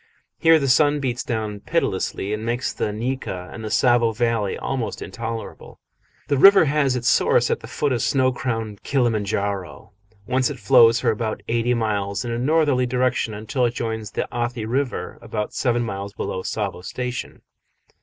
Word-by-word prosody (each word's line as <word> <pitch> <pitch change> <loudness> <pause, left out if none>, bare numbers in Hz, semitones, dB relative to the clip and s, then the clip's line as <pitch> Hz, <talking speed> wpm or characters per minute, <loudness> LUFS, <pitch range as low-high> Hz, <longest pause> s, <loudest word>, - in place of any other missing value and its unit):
Here 165 -1 +6
the 140 -3 -1
sun 145 +3 +4
beats 125 -3 -2
down 110 -3 -3
pitilessly, 100 0 -1
and 105 +1 -3
makes 120 +3 -2
the 105 - -2
nyika 110 -5 -4
of - - -8
the 110 - -5
Tsavo 120 0 +3
valley 115 -3 0
almost 130 -4 -3
intolerable. 115 +3 -7 0.5
The 140 -2 +1
river 195 +1 +8
has 140 -3 +1
its 125 0 -2
source 130 - +3
at - - 0
the - - -10
foot 145 - -1
of 120 -3 0
snow 130 +1 +2
crowned 115 -6 -4
Kilima 120 -6 +1
N'jaro, 100 -2 -3 0.3
whence 130 +2 +1
it - - -6
flows 120 -3 +5
for 120 -2 +2
about 110 0 -3
eighty 120 +1 +1
miles 105 -2 -1
in 120 - -3
a 115 - -2
northerly 140 -2 +2
direction 125 -3 0
until 110 +5 -2
it 120 - -5
joins 110 -2 -3
the - - -3
Athi 120 -1 -2
River, 125 -5 -2
about 110 -2 -4
seven 120 -1 +1
miles 100 -2 -5
below 95 -1 -4
Tsavo 100 -2 -3
Station. 125 +4 -5
120 Hz, 175 wpm, -22 LUFS, 110-130 Hz, 0.5 s, river